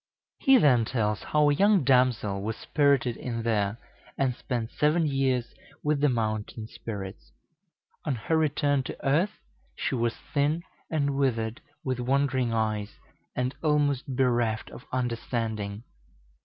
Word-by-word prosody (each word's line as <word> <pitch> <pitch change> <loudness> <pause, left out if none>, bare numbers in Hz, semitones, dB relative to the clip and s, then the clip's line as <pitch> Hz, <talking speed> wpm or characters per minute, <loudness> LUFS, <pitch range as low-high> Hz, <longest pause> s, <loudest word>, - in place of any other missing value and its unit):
He 270 -1 +6
then 130 - +5
tells 105 -3 -1
how 150 -1 +2
a 145 - +4
young 200 +1 +4
damsel 125 -7 +2
was 110 +2 -3
spirited 140 -5 +2
in 115 -2 -4
there, 105 -2 0 0.4
and 135 -2 +1
spent 120 -3 -3
seven 155 +3 +2
years 135 -4 0 0.3
with 150 -1 +1
the 145 - +4
mountain 110 -2 -2
spirits. 100 -3 -7 0.7
On 145 -4 -1
her 120 +8 -1
return 145 -2 +2
to - - -7
earth 170 +10 +2 0.4
she - - -2
was 120 -2 0 0.2
thin 150 +4 +1 0.3
and 140 -3 0
withered, 115 -4 0 0.2
with 130 -2 -2
wandering 130 -1 +1
eyes, 110 -2 -1 0.4
and 125 +1 -1
almost 145 -4 +1
bereft 120 -4 +1
of 125 - -11
understanding. 115 -4 -2
125 Hz, 135 wpm, -27 LUFS, 115-145 Hz, 0.7 s, He